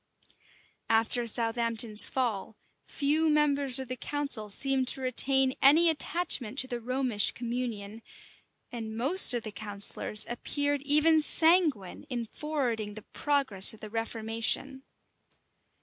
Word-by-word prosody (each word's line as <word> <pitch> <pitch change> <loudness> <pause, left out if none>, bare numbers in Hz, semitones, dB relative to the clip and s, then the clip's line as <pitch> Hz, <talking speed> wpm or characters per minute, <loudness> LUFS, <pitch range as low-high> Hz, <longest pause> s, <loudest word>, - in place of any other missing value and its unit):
After 230 +2 +1
Southampton's 230 -1 +2
fall, 225 -5 -4 0.3
few 310 +3 -1
members 285 -3 +2
of 265 -1 -3
the 255 - -5
council 275 -6 -4
seemed 265 +4 0
to 265 - -1
retain 260 +1 +3
any 320 +5 +4
attachment 295 -6 -1
to 260 - -1
the 245 -2 -6
Romish 250 -3 -2
communion; 230 -3 -7 0.7
and 225 -2 -8
most 280 +10 +3
of 235 - -4
the 215 - -8
counsellors 210 0 0
appeared 285 +4 -3
even 305 +3 +3
sanguine 310 - +2
in 240 -3 -5
forwarding 235 -7 -5
the 215 - -11
progress 265 -10 +3
of - - -21
the 215 - -11
reformation. 225 +4 -3
250 Hz, 120 wpm, -27 LUFS, 225-285 Hz, 0.7 s, any